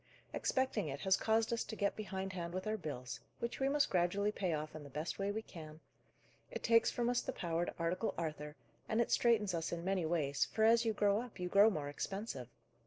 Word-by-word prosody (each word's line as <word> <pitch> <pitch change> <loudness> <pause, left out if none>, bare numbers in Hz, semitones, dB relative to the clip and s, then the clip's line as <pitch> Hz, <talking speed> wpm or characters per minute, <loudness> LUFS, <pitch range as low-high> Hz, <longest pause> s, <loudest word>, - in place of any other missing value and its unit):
Expecting 260 -8 0
it 140 -1 -5
has 190 -1 +4
caused 225 +2 +2
us 230 - 0
to - - -6
get 200 -1 0
behindhand 190 -4 -4
with 185 - -3
our 215 0 0
bills, 125 - -5 0.2
which 235 - -4
we 270 0 +2
must 285 0 +2
gradually 190 +3 +2
pay 190 -4 -1
off 155 -1 -3
in 155 - -6
the 145 - -10
best 150 +7 -4
way 195 0 0
we 220 +2 -2
can; 155 -6 -10 0.7
it - - -6
takes 230 0 +5
from 240 -1 -1
us 245 0 +2
the - - -3
power 170 -5 -1
to - - -5
article 175 +6 -1
Arthur, 150 -2 -4 0.3
and 220 - +1
it 235 - +1
straitens 215 -5 +3
us 165 -1 -2
in 170 0 -4
many 185 -4 +1
ways, 145 -4 +1
for, 220 - -1
as 230 +1 +5
you 225 - +2
grow 205 +1 +2
up, 245 -5 -10
you 180 0 -2
grow 200 +4 +7
more 150 -8 -3
expensive. 145 - -4
190 Hz, 225 wpm, -36 LUFS, 160-220 Hz, 0.7 s, grow